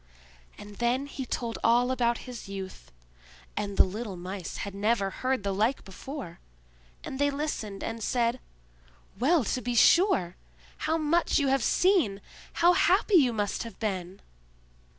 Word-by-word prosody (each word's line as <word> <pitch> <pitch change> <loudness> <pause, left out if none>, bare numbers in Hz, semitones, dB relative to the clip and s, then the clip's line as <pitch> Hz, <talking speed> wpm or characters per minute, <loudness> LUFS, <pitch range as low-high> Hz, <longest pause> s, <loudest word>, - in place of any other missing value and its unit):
And 205 0 -11
then 245 +3 0
he 270 -2 -6
told 235 -2 -3
all 245 +2 +4
about 240 -2 0
his 245 -5 -8
youth; 190 - -8 0.6
and 200 -1 -3
the - - +8
little 205 +1 -5
Mice 185 0 -6
had 200 - -7
never 200 0 0
heard 255 +1 -1
the 200 -1 -1
like 220 +7 0
before; 195 - -8 0.6
and 265 - -6
they 285 0 +3
listened 280 -9 -4
and 225 0 -4
said: 240 +1 0 0.8
"Well, 295 +4 +3
to 255 +3 -2
be 245 +1 -2
sure! 235 - +4 0.5
How 320 - +2
much 325 +2 +2
you 280 -2 +2
have 270 -1 +2
seen! 340 - +2 0.3
How 350 +1 +4
happy 375 +2 +4
you 265 -6 +4
must 205 -3 -2
have 230 -1 -8
been!" 190 -3 -4
235 Hz, 150 wpm, -28 LUFS, 200-275 Hz, 0.8 s, the